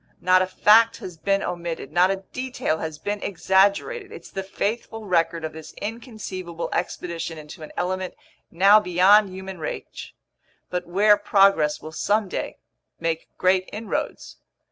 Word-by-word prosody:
Not 185 0 +4
a 185 - +1
fact 220 +4 +5
has 180 - -8
been 195 +5 0
omitted, 170 -5 -4
not 175 +3 +4
a 195 0 -2
detail 255 -11 -2
has 160 -1 -5
been 205 +6 -4
exaggerated. 200 - +1
It's - - -11
the 195 - -3
faithful 215 +3 -3
record 165 -3 +1
of 160 - -5
this 160 -1 -10
inconceivable 205 -6 -6
expedition 170 -2 -3
into 150 +1 -11
an 155 - -9
element 185 +1 -2 0.3
now 195 +5 +6
beyond 195 +2 +5
human 190 -1 -8
reach, 155 - -7 0.6
but 180 -1 -3
where 205 +4 +5
progress 195 -7 +3
will 155 - -7
someday 205 +4 -1 0.4
make 165 -1 -2
great 185 0 +2
inroads. 215 +1 -4
185 Hz, 145 wpm, -24 LUFS, 170-205 Hz, 0.6 s, now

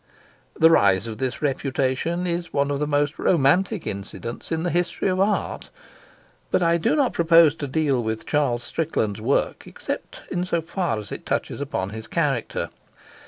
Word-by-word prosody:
The 160 0 +6
rise 100 - +4
of 110 -1 -6
this 130 +2 -3
reputation 135 +5 0
is 175 0 -2
one 140 0 +1
of 140 - -1
the 150 - 0
most 145 0 0
romantic 180 +5 +2
incidents 100 +7 -6
in 165 0 0
the 175 - 0
history 175 +2 0
of 185 0 0
art. 205 +2 0 0.8
But 180 - +2
I 170 0 +3
do 165 - +1
not 280 -5 +2
propose 165 -2 +6
to 145 - -4
deal 140 -3 +1
with 110 -1 -3
Charles 135 -6 +1
Strickland's 110 -7 -2
work 130 +6 0
except - - -6
in 175 - 0
so 175 -2 0
far 165 - -2
as 105 -2 -7
it - - -6
touches - - -2
upon 100 -9 -3
his 110 0 -7
character. 135 - -1
145 Hz, 170 wpm, -24 LUFS, 120-170 Hz, 0.8 s, The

